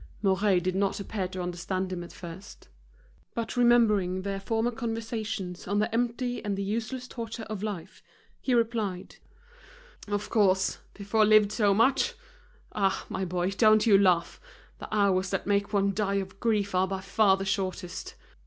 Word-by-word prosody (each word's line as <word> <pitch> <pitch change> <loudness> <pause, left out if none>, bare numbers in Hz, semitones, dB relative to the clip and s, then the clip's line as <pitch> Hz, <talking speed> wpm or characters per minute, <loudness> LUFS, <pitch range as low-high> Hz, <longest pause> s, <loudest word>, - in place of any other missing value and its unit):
Mouret 195 -1 +3
did 185 +1 -1
not 195 +2 0
appear 200 -1 -3
to 185 0 -5
understand 185 +1 -3
him 175 -1 -4
at 170 - -10
first. 175 - -11 0.7
But 230 +1 -3
remembered 210 -7 +3
their 195 0 -3
former 225 +4 0
conversations 225 -5 -4
on 200 +2 0
the 215 +2 0
empty 245 +1 -1
and 205 -2 -2
the 200 - -2
useless 230 +5 -3
torture 230 -2 -6
of 215 -3 -6
life, 205 -6 -6 0.4
he 255 - +1
replied: 220 -6 -1 0.9
"Of 205 0 -3
course, 190 -4 +2 0.2
before 210 +2 +1
lived 210 -1 +5
so 205 -2 +2
much. 270 - +3 0.6
Ah! 195 -2 0
my 190 - -2
boy, 180 +1 -1
don't 215 +2 +4
you 215 -3 +6
laugh, 185 -3 +2 0.4
the - - -8
hours 195 -3 +2
that 195 - -2
make 200 0 +1
one 200 -1 +2
die 200 0 0
of 190 0 -4
grief 210 -4 0
are 185 +1 +2
by 190 0 -4
far 195 0 +3
the 195 - -4
shortest." 185 -2 -3
200 Hz, 160 wpm, -28 LUFS, 190-220 Hz, 0.9 s, you